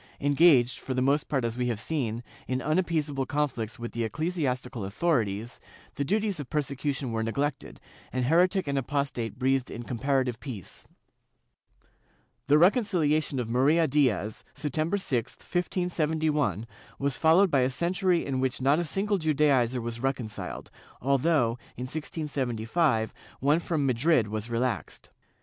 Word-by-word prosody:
Engaged, 140 -4 +4
for 130 - -4
the 130 - +1
most 140 +3 +1
part 135 -5 0
as 115 0 -2
we 125 0 -1
have 115 -4 -1
seen, 120 -5 -2 0.2
in 130 0 -1
unappeaseable 155 -3 0
conflicts 135 -7 -2
with 120 -1 -6
the 120 - -2
ecclesiastical 130 - -2
authorities, 110 - -1 0.3
the 140 - -2
duties 205 +2 0
of 145 - -6
persecution 140 -3 -2
were 115 0 -1
neglected, 140 +5 -2 0.3
and 130 -1 -1
heretic 180 +5 +3
and 140 -1 +1
apostate 135 -4 -2
breathed 130 0 +1
in 120 - -6
comparative 130 0 0
peace. 115 - -8 1.6
The 145 +2 +6
reconciliation 165 - +3
of 125 -3 -1
Maria 140 +8 +3
Diez, 130 -7 +1
September 155 +6 -1
6, 130 - -2
1579, 160 - -1 0.3
was 140 -1 -1
followed 170 +4 +5
by 140 - +4
a 125 - +2
century 175 +5 +1
in 135 -2 -1
which 130 -1 0
not 140 +4 +3
a 175 - -1
single 195 +5 0
Judaizer 140 -6 +2
was 115 0 -4
reconciled, 125 -4 -4 0.3
although, 135 -3 +2 0.2
in 125 - -4
1675, 130 - -1 0.3
one 145 +4 +3
from 160 -4 -1
Madrid 130 -2 +2
was 110 +2 -4
relaxed. 120 -2 -3
140 Hz, 140 wpm, -28 LUFS, 120-155 Hz, 1.6 s, The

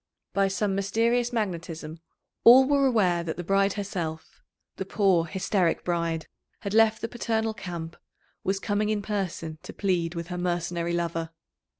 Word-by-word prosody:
By 195 0 +3
some 195 +1 0
mysterious 230 +5 +1
magnetism 170 -7 -4 0.4
all 255 +3 +9
were 280 -1 +4
aware 185 -8 +2
that 165 -2 -4
the 175 - -4
BRIDE 195 +2 +2
herself 175 -6 -5 0.4
the - - -2
poor 190 -4 +2
hysteric 185 0 0
bride 170 -2 -1 0.4
had 200 - -4
left 225 0 +4
the 230 - -1
paternal 225 -1 -1
camp, 170 -6 -6 0.5
was 195 +1 0
coming 210 +1 0
in 210 -1 0
person 180 -6 -3
to - - -9
plead 175 -4 0
with 170 +1 -5
her 180 0 -4
mercenary 175 -1 -1
lover. 165 -1 -2
190 Hz, 155 wpm, -27 LUFS, 170-215 Hz, 0.5 s, all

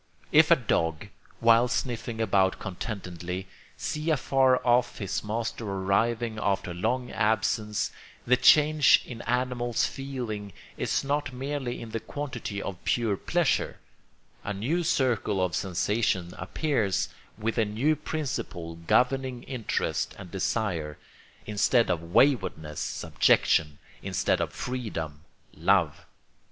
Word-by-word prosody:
If - - +6
a - - +8
dog, 80 +4 -1 0.3
while 115 +1 +6
sniffing 120 -2 -3
about 95 -3 +2
contentedly, 90 -2 -5 0.3
sees 155 +2 -3
afar 135 -3 +3
off 120 0 +3
his 100 -3 -3
master 115 +2 -3
arriving 110 +3 0
after 95 -3 0
long 120 +8 -1
absence, 105 -1 0 0.3
the 125 - +5
change 150 +3 +6
in 120 -2 -8
the - - -8
animal's 125 -1 0
feeling 120 -7 -5 0.2
is - - -1
not 145 +1 -1
merely 130 -1 -3
in 115 - -8
the 115 - -2
quantity 120 -7 -5
of 95 -3 -6
pure 115 -4 +1
pleasure; - - 0 0.7
a 105 - -3
new 140 - 0
circle 120 - +1
of 90 -3 0
sensations 95 -1 0
appears, 105 - 0 0.3
with 115 +2 -1
a 110 - +3
new 120 +10 +1
principle 135 - -4
governing 125 +8 +1
interest 125 -5 -2
and 90 - -10
desire; 90 -7 -2 0.5
instead 110 +3 +2
of 85 - -1
waywardness 90 - +1
subjection, 75 -2 +2 0.2
instead - - 0
of - - -2
freedom 85 - -5 0.3
love. - - +1
115 Hz, 120 wpm, -27 LUFS, 95-125 Hz, 0.7 s, a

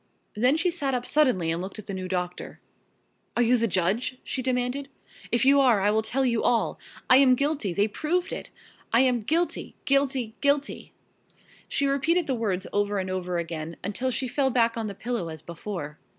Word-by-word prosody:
Then 250 +7 +3
she 350 +2 +1
sat 280 -6 -1
up 245 0 -2
suddenly 250 - +2
and 165 +1 -1
looked 190 +3 -6
at 215 - -8
the 195 - -5
new 185 -1 -4
doctor. 180 -1 -4 0.8
"Are 240 - +4
you 240 +2 +4
the 230 -1 +2
judge?" 195 +7 0
she 260 - -3
demanded. 255 +2 -1 0.4
"If 240 +2 +2
you 280 +1 +6
are 245 -6 +4
I 205 +2 +2
will 220 +1 +2
tell 255 +5 -1
you 235 -3 +1
all. 240 -1 +1 0.3
I 255 - +7
am 265 -2 +6
guilty 280 - 0
they 200 +4 +2
proved 345 - -1
it! - - -6 0.4
I 230 - +5
am 250 -3 +2
guilty! 330 +10 -1
guilty! 270 -5 +1
guilty!" 285 0 0 0.8
she 280 - 0
repeated 305 +6 +2
the 270 - -1
words 200 -6 -1
over 205 0 +1
and 185 -1 -2
over 180 -1 -2
again, 165 -1 -4
until 210 +7 -1
she 255 +1 -2
fell 270 +2 +1
back 235 -2 +2
on 225 -2 -3
the 200 - -6
pillow 220 -4 -3
as 160 -1 -8
before. 170 -3 -6
235 Hz, 195 wpm, -26 LUFS, 195-270 Hz, 0.8 s, I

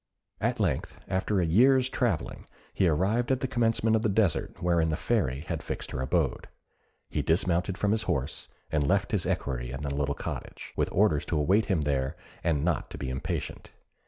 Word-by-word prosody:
At - - 0
length, - - -1
after 95 +1 0
a 90 - +2
year's 125 +9 +5
travelling, - - -1 0.3
he 95 - +2
arrived 100 - +1
at 130 0 +1
the 130 - 0
commencement 115 -3 +2
of 110 - +2
the 110 - +1
desert 100 -4 +1
wherein 85 -2 +2
the 75 - 0
Fairy 75 - 0
had 80 - -4
fixed - - -5
her 65 - -3
abode; 65 - 0 0.6
he - - -1
dismounted 90 +2 +1
from 100 0 +1
his 110 0 +2
horse, 70 +3 -2 0.2
and 75 -2 +1
left 100 +1 +1
his 100 -5 +1
equerry - - -2
in 65 +4 -5
a - - -1
little 70 0 -1
cottage, - - -6
with - - 0
orders 90 -7 +3
to 80 - 0
await 95 +9 +3
him 95 -6 +1
there, 70 -2 0 0.3
and 80 -3 +1
not 85 -5 0
to - - -8
be 65 -2 -4
impatient. 65 - -4
85 Hz, 190 wpm, -28 LUFS, 75-105 Hz, 0.6 s, year's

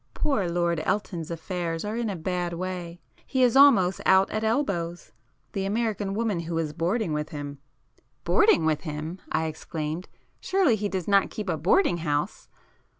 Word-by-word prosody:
Poor 210 - 0
Lord 170 -1 0
Elton's 175 -5 -2
affairs 170 0 -3
are 210 +1 -3
in 235 -1 -1
a 200 - -3
bad 175 0 -2
way—he 180 +8 -4
is 245 -1 +4
almost 200 -11 +6
out 190 +1 +4
at 215 +1 -2
elbows;—the 175 - -3
American 205 -1 -1
woman 215 -5 0
who 165 0 -3
is 155 -2 -2
boarding 175 +3 0
with 150 0 -2
him——" 145 -1 -6 0.6
"Boarding 430 - +4
with 155 -2 +1
him!" 155 +3 -5
I 160 0 +1
exclaimed—"Surely 165 - -2
he 205 -1 -2
does 185 -3 -3
not 200 -1 +4
keep 210 -3 -5
a 165 - +1
boarding 175 - +3
house?" 150 -3 -2
180 Hz, 150 wpm, -26 LUFS, 165-210 Hz, 0.6 s, almost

